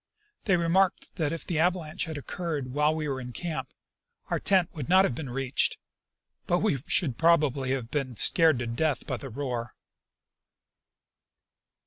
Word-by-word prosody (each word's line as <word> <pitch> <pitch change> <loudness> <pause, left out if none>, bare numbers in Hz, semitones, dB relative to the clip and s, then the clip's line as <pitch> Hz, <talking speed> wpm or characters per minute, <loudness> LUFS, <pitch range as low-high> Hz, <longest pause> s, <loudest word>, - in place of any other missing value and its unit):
They 195 -4 +3
remarked 175 +3 +1
that 155 -4 0
if 165 - -4
the 165 -3 -1
avalanche 170 -2 0
had 160 -2 -6
occurred 145 -3 -4
while 150 +2 +2
we 155 -1 -2
were 135 -2 -3
in 125 -1 -8
camp, 145 -6 -4 0.6
our - - +1
tent 185 -4 +2
would 150 -6 -6
not 190 +1 +6
have 130 - -1
been 135 +1 -6
reached, 130 +1 0 0.7
but 175 - +3
that - - -2
we 145 -11 +1
should 140 -10 +1
probably 150 -6 +3
have 125 -4 -4
been 135 -4 -2
scared 160 - +5
to 120 - -3
death 125 +3 -1
by 130 - -3
the 135 - -8
roar. 120 -2 -4
150 Hz, 165 wpm, -28 LUFS, 130-170 Hz, 0.7 s, not